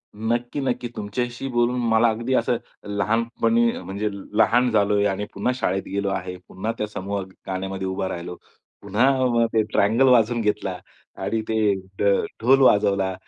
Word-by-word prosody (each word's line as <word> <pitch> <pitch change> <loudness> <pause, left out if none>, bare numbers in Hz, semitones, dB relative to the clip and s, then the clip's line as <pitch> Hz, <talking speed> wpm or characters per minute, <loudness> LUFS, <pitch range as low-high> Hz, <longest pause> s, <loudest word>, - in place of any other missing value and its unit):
नक्की 120 +5 -2
नक्की 125 -2 -2
तुमच्याशी 120 +5 -4
बोलून 120 +1 +1
मला 110 +1 +4
अगदी 115 +4 -2
असं 120 0 +1 0.4
लहानपणी 115 - +1
म्हणजे 105 +2 -3 0.3
लहान 125 +2 +4
झालोय 105 -1 +2
आणि 100 +1 -2
पुन्हा 100 +6 0
शाळेत 95 -6 -1
गेलो 100 0 -2
आहे, 90 -1 -3
पुन्हा 110 +5 -4
त्या 105 - -2
समूह 100 -1 -4 0.3
गाण्यामध्ये 95 0 -3
उभा 95 0 -2
राहिलो. 90 +1 -6 0.5
पुन्हा 120 +3 +2
ते 110 - +4
ट्रायंगल 115 +6 +3
वाजवून 120 -1 +4
घेतला 105 -3 -1 0.5
आणि 110 +3 -1
ते 110 -2 +2 0.3
ढ - - 0 0.4
ढोल 135 +3 +5
वाजवला 100 -5 +3
110 Hz, 145 wpm, -23 LUFS, 100-120 Hz, 0.5 s, ढोल